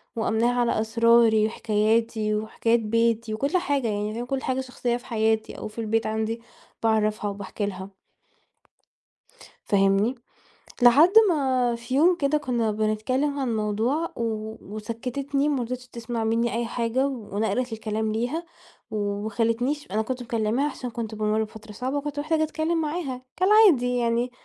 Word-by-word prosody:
وأمّناها 230 +2 +1
على 235 -2 +1
أسراري 225 -1 +4
وحكاياتي 220 0 0
وحكايات 225 +2 +1
بيتي 230 0 0
وكل 280 +10 0
حاجة، 285 -8 0
يعني 210 0 -2
فاهم، 235 +2 -4
كل 265 +1 -2
حاجة 260 0 -1
شخصية 250 -2 -2
في 245 - -15
حياتي 220 -1 0
أو - - -5
في 215 +2 -6
البيت 225 0 0
عندي 220 +1 -2 0.4
باعرفها 215 -2 +1
وباحكي 200 +1 -4
لها. 190 -1 -6 1.8
فاهمني؟ 195 +4 +2 0.7
لحد 275 +8 +7 0.2
ما 260 -6 +1
في 235 +2 -5
يوم 340 +6 +5
كده 285 -1 +1
كُنّا 240 -6 0
بنتكلّم 220 +7 0
عن 250 -4 -1
موضوع 220 +10 0
و 235 - -3 0.5
وسكّتتني 260 +6 -2
ما 280 -4 0
رضيتش 250 +1 -5
تسمع 235 -1 -4
منّي 230 +2 +1
أي 235 0 -1
حاجة 235 +3 0
ونقلت 225 0 -2
الكلام 220 0 -2
ليها 245 +10 -2 0.5
وما 205 0 -2
خلّتنيش 240 +5 -1
أنا 215 +2 +1
كنت 250 +2 -4
مكلّماها 235 +4 0
عشان 250 - -6
كنت 225 -2 -5
بامُر 215 +1 +1
بفترة 220 0 -10
صعبة 255 +6 -3
وكنت 290 0 -4
محتاجة 315 +1 +1
أتكلّم 315 +2 -1
معاها 300 -5 -3 0.2
كالعادي 370 - +5
يعني 235 +1 0
235 Hz, 145 wpm, -25 LUFS, 220-260 Hz, 1.8 s, لحد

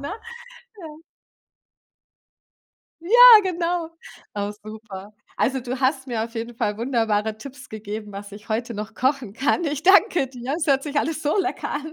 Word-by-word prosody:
ne? 285 +7 -5 0.7
Ja. 310 0 -11 2.0
Ja, 335 - -10 0.3
genau. 345 -2 -2 0.4
Oh, 205 0 -2
super. 215 -2 -10 0.2
Also, 265 +2 0
du 250 +1 -5
hast 265 0 0
mir 235 -3 -2
auf 230 +1 -7
jeden 230 +1 -5
Fall 210 -2 -1
wunderbare 220 -3 0
Tipps 265 +3 -11
gegeben, 210 -1 -7
was 200 +1 -8
ich 210 +2 -12
heute 230 +2 -2
noch 215 0 -7
kochen 260 -5 -1
kann, 280 - 0
ich 295 -1 -3
danke 370 - +4
dir. 255 +1 -5
Es 325 - -2
hört 275 -2 +2
sich 295 -1 -6
alles 315 0 -2
so 295 +5 0
lecker 375 -1 -2
an. 305 +2 -5
255 Hz, 160 wpm, -23 LUFS, 220-300 Hz, 2.0 s, danke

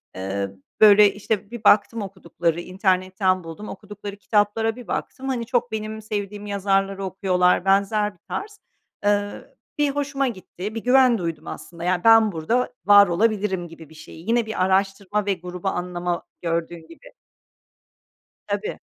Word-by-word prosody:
Imm, 95 0 -4 0.2
böyle, 210 -1 +8
işte, 205 0 -3
bir 240 -2 -8
baktım, 215 +2 +4
okudukları, 175 -4 -2
internetten 185 0 0
buldum, 165 +6 -8
okudukları 205 -1 -8
kitaplara 215 +2 +1
bir 245 -2 -11
baktım, 270 +1 -4
hani, 240 -3 -2
çok 245 0 0
benim 220 0 -4
sevdiğim 205 -1 -5
yazarları 195 -1 0
okuyorlar, 185 -1 +1
benzer 200 +2 +2
bir 175 - -30
tarz. 420 +1 -5 0.5
Iıı, 205 0 -1 0.2
bir 295 -1 +2
hoşuma 280 -1 -1
gitti, 205 -1 -6
bir 225 - -4
güven 255 -1 +5
duydum 170 -4 -5
aslında, 170 -1 -8
yani, 180 0 0
ben 225 -1 +6
burada 225 +10 -1
var 205 0 +8
olabilirim 190 -1 0
gibi 165 -2 -13
bir 160 - -16
şeyi, 160 +3 -12
yine 235 0 +2
bir 220 -4 -1
araştırma 195 +2 0
ve 200 - +2
grubu 180 +1 -7
anlama, 175 -1 -2 0.2
gördüğün 165 -1 -3
gibi. 165 - -15 1.3
Tabii. 440 - -3
200 Hz, 145 wpm, -23 LUFS, 180-220 Hz, 1.3 s, böyle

